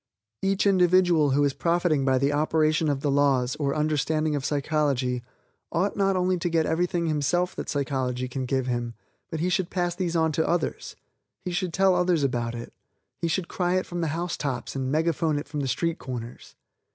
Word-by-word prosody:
Each 195 +1 +1
individual 180 -5 +4
who 140 +2 +3
is 140 -1 +2
profiting 170 -3 +1
by 130 -1 +3
the 140 +2 +1
operation 155 +1 +2
of 140 -2 -1
the 145 - 0
laws, 135 -3 +2
or 140 -2 -1
understanding 155 0 0
of 140 - -2
psychology, 140 -4 0 0.5
ought 185 +4 0
not 195 -1 +2
only 185 0 +1
to 175 - -1
get 165 -1 +2
everything 175 +2 0
himself 160 +4 0
that - - -5
psychology 130 -3 -1
can 130 0 -4
give 130 0 0
him, 120 -2 -2 0.3
but 160 -1 -4
he 180 - +1
should 180 0 0
pass 175 -2 -1
these 175 -1 -2
on 160 -1 +2
to 160 +1 0
others; 175 -1 -2 0.5
he 180 - -2
should 175 0 -1
tell 190 +2 +3
others 180 -3 +2
about 120 -3 -1
it; 120 0 -8 0.5
he 170 - +1
should 170 +1 -1
cry 180 0 0
it 185 - 0
from 175 -1 -4
the 165 - 0
housetops 150 -6 -3
and 130 -1 -2
megaphone 160 0 +1
it 145 - -5
from 150 0 -4
the 140 - -1
street 165 +5 -1
corners. 120 -2 -7
155 Hz, 195 wpm, -26 LUFS, 140-175 Hz, 0.5 s, individual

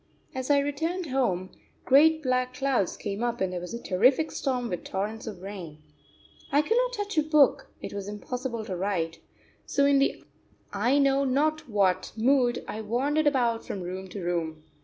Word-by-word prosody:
As 260 +1 -4
I 285 - +5
returned 320 +4 -1
home, 185 -9 0 0.3
great 315 +4 +5
black 255 -1 0
clouds 260 -8 0
came 205 +2 -4
up 240 0 -1
and 190 -1 -1
there 180 - -2
was 180 +6 -6
a - - -5
terrific 255 +11 +2
storm 250 -3 -1
with 180 - -4
torrents 215 +4 -4
of 190 -4 -7
rain. 185 -6 -7 0.7
I 290 +1 +4
could 450 - +1
not - - +2
touch 410 -6 -1
a - - +5
book, 300 -2 +3
it - - -6
was 200 -1 -5
impossible 235 +2 -4
to 190 - -4
write, 175 -3 -2 0.5
so 280 - +2
in 280 -1 +4
the 275 - 0 0.5
I 235 +7 +2
know 275 -1 +3
not 290 +2 0
what 190 -3 +1
mood 245 +1 +2
I 220 - -5
wandered 275 +8 +1
about 240 -5 +1
from 195 - -5
room 185 +2 -5
to 185 0 -7
room. 165 -3 -2
245 Hz, 180 wpm, -27 LUFS, 195-280 Hz, 0.7 s, I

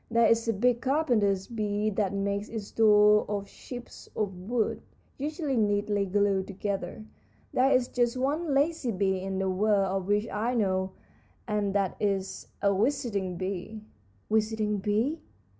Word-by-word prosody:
There 235 0 +4
is 230 +1 +3
a 225 - +2
big 240 +3 +2
carpenter 250 -8 +2 0.2
bee 210 -1 0
that 200 -1 0
makes 200 +1 -2
its 220 -3 -6
doors 210 -1 +5
of 205 -1 -2
chips 245 +4 -10
of 205 -3 -1
wood, 215 +5 -1 0.4
usually 300 -1 -2
neatly 205 -2 +1
glued 195 0 +1
together. 200 +1 -4 0.5
There 260 +2 +4
is 255 -3 +3
just 240 -1 0
one 295 +5 0
lazy 285 -1 +1
bee 190 -1 0
in 190 0 -3
the 190 0 0
world 195 0 +2
of 180 - -10
which 205 +2 +1
I 230 +4 -1
know, 190 -3 0 0.5
and 205 -2 -1
that 195 -2 0
is 195 -2 -2 0.2
a 200 0 +4
visiting 210 -6 0
bee." 190 +3 -4 0.5
"Visiting 215 -1 +1
bees?" 220 +11 0
210 Hz, 150 wpm, -28 LUFS, 195-235 Hz, 0.5 s, doors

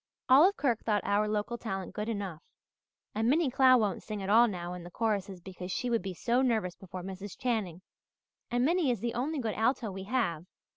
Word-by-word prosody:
Olive 315 +10 +6
Kirk 245 -6 0
thought 210 -3 +1
our 205 +1 +2
local 215 +3 -2
talent 195 -5 -5
good 210 +2 -3
enough 195 -7 -4 0.7
and 225 +2 +1
Minnie 295 -1 +2
Clow 260 0 +6
won't 210 -5 0
sing 210 -2 -5
at 195 - -1
all 235 +3 +7
now 175 -4 -4
in 180 - -7
the 175 - -9
choruses 200 -2 -2
because 185 0 -8
she 245 +5 -2
would 230 - +2
be 190 0 -5
so 240 +7 +1
nervous 220 -9 0
before 185 -1 -9
Mrs. 195 +1 -7
Channing. 205 -8 -2 0.7
And 245 +1 +1
Minnie 335 -2 +2
is 240 -4 0
the 235 -1 -2
only 280 +7 -2
good 230 -5 -2
alto 225 -1 0
we 190 0 -7
have! 190 -8 -1
215 Hz, 205 wpm, -30 LUFS, 190-245 Hz, 0.7 s, all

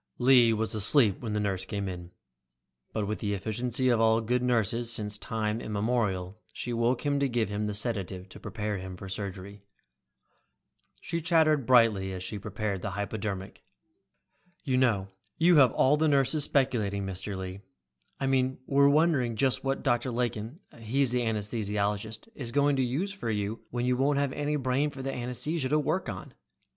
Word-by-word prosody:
Lee 125 -2 +6
was 110 0 -1
asleep 110 0 +4
when 110 -3 -4
the 105 - 0
nurse 95 -3 -1
came, 95 -4 -5 0.8
but 110 -2 -2
with 105 -2 -3
the 100 -1 -1
efficiency 120 +5 -1
of 120 -2 +3
all 110 0 +4
good 120 +2 0
nurses 120 -1 +1
since 105 -2 0
time 110 +1 -2
immemorial, 105 -3 -1
she 120 - -4
woke 120 +4 0
him 145 -1 +1
to 140 -1 +1
give 115 -4 0
him 105 +1 -2
the 105 - -2
sedative 100 -4 -1
to - - -11
prepare 105 -3 -4
him 95 0 -7
for 95 - -8
surgery. 100 0 -6 1.4
She 170 0 -3
chattered 155 -5 +3
brightly 110 -7 +4
as 90 -1 -5
she 105 +2 -5
prepared 105 -1 -3
the - - -3
hypodermic. 100 -2 -5 1.0
"You 130 -4 0
know, 105 -7 +2 0.3
you 170 0 +5
have 130 -5 +7
all 140 +3 +4
the 160 +1 +2
nurses 145 +1 +2
speculating, 105 -9 0
Mr. 95 +1 -5
Lee. 95 +1 -6 0.6
I 135 - -1
mean 130 -1 +1
we're 140 +1 +4
wondering 145 -6 +2
just 130 +2 0
what 135 0 -1
Dr. 120 -1 +1
Lakin, 120 - -3 0.2
he's 125 +3 +1
the 125 0 +1
anesthesiologist, 105 - -2
is 125 - -5
going 145 +2 +3
to - - +2
use 155 +11 -2
for 195 - -5
you 105 +1 -3
when 120 0 -2
you 125 0 +2
won't 140 +3 +2
have 140 -1 0
any 145 +1 -1
brain 135 +1 0
for 135 -2 -8
the 135 - -3
anesthesia 130 +4 -3
to 150 - +3
work 155 +1 -1
on." 95 -4 -7
115 Hz, 175 wpm, -28 LUFS, 105-135 Hz, 1.4 s, have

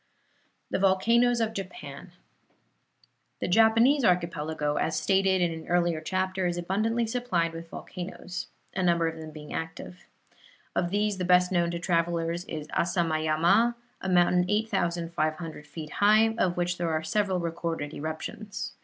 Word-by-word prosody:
THE - - 0
VOLCANOES 230 +6 +3
OF 220 -1 0
JAPAN 195 - -8 1.3
The - - -2
Japanese 230 +7 +5
archipelago, 160 -5 0
as 160 -1 0
stated 190 -1 +2
in 175 -1 +2
an 160 0 -7
earlier 175 -2 +1
chapter, 185 +2 -1
is 175 0 -2
abundantly 215 +7 0
supplied 220 -9 -1
with 165 0 -8
volcanoes, 180 +1 -7 0.3
a 190 - 0
number 170 -2 +3
of 165 0 -4
them 160 -1 -8
being 150 -1 -10
active. 165 +2 -6 0.7
Of 175 - +1
these 205 0 0
the - - -1
best 180 0 +4
known 175 -2 +2
to 170 - -3
travelers 170 0 0
is 155 -1 -6
Asamayama, 170 +6 +2 0.3
a 190 - -3
mountain 180 0 +4
8,500 170 -7 -1
feet 155 0 -8
high, 215 +2 +4
of 180 -6 0
which 175 0 -1
there 170 -1 0
are 160 0 -1
several 190 +2 0
recorded 165 -3 -3
eruptions. 160 +7 -5
175 Hz, 145 wpm, -27 LUFS, 165-195 Hz, 1.3 s, Japanese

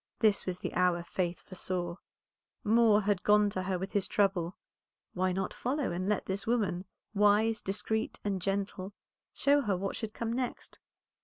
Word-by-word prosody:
This 215 -4 +2
was 180 -1 -1
the - - -5
hour 180 -1 +2
Faith 175 0 -2
foresaw; 180 -1 -4 0.7
Moor 220 -1 +5
had 200 -2 +1
gone 210 0 +4
to 185 - -2
her 185 0 -1
with 190 +2 -5
his 200 -2 +1
trouble, 190 -3 +1 0.6
why 185 0 +1
not 190 +1 -2
follow, 265 - -1
and 185 +3 -2
let 210 - 0
this 195 +2 -3
woman, 200 -6 0 0.3
wise, 210 +2 +4
discreet, 210 +3 -2
and 195 -2 -1
gentle, 195 0 -2 0.4
show 285 +1 +3
her 205 -7 0
what 195 +1 -3
should 220 -2 -5
come 230 0 -2
next? 250 0 -4
200 Hz, 165 wpm, -31 LUFS, 185-215 Hz, 0.7 s, Moor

